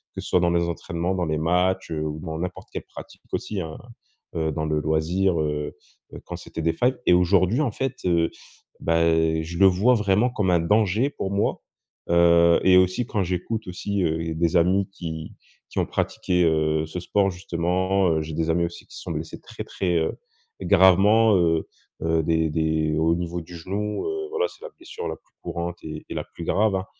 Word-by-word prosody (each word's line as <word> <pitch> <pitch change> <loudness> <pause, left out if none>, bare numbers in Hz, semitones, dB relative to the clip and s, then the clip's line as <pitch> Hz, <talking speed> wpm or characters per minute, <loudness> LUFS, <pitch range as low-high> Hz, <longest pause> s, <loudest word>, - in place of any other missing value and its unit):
que - - -4
ce - - -7
soit 90 - +4
dans 85 -1 +2
les 85 0 +2
entraînements, 85 +1 -3
dans 90 -2 -1
les 80 -1 -1
matchs, 90 +3 +1
heu, 80 -1 -2
ou 75 0 -4
dans 80 -3 -5
n'importe 90 +1 -5
quelle - - -5
pratique - - -12
aussi 105 - -3
hein, 80 -2 -6 0.6
heu, 80 -1 0
dans 80 +1 -2
le 75 0 0
loisir, 80 +4 +1
heu, 75 -1 -2 0.4
heu, - - -9
quand - - -6
c'était 80 - -7
des 80 - +3
failles. 125 +9 +1
Et - - +7
aujourd'hui, 95 - +3
en 135 -6 0
fait, 135 +4 -3
heu, 85 -2 +2 0.5
bah, 85 0 +1 0.4
je 85 +2 -6
le 100 - +7
vois 100 +7 +4
vraiment 105 +2 +2
comme 105 -7 0
un 85 - +4
danger 105 +8 +2
pour 100 -9 -4
moi, 100 +1 0 0.5
heu 85 0 +5
et 95 -1 +6
aussi 95 +6 +2
quand 105 -5 0
j'écoute 95 +5 -3
aussi, 95 +2 -2
heu, 80 0 -1
des 85 +2 +1
amis 95 +3 +3
qui 80 -4 -7 0.4
qui - - -3
ont - - +2
pratiqué, 90 -1 0
heu, 80 -1 +1
ce 85 +3 -5
sport 100 +2 +1
justement, 90 +1 0
heu, 80 -1 +1
j'ai 80 +1 -6
des 80 0 -1
amis 85 +1 +1
aussi 85 0 -8
qui - - -14
se - - -8
sont - - -5
blessés - - -5
très, - - -8
très, 90 -2 -1
heu, 80 - -1 0.4
gravement, 100 +4 +5
heu, 80 -2 +1 0.4
heu, 80 0 +2
des 80 0 +1
des 80 0 0
au 80 +1 +3
niveau 85 0 -3
du 85 +2 -11
genou, 100 +5 -3
heu, 400 0 -3
voilà, 455 +2 0
c'est - - -16
la - - -6
blessure 450 +7 -7
la - - -3
plus - - -38
courante, 85 0 -4
et 75 -1 -7
et - - -5
la - - -2
plus - - -10
grave, 100 +2 +2
hein. 95 0 -2
90 Hz, 210 wpm, -24 LUFS, 80-95 Hz, 0.6 s, Et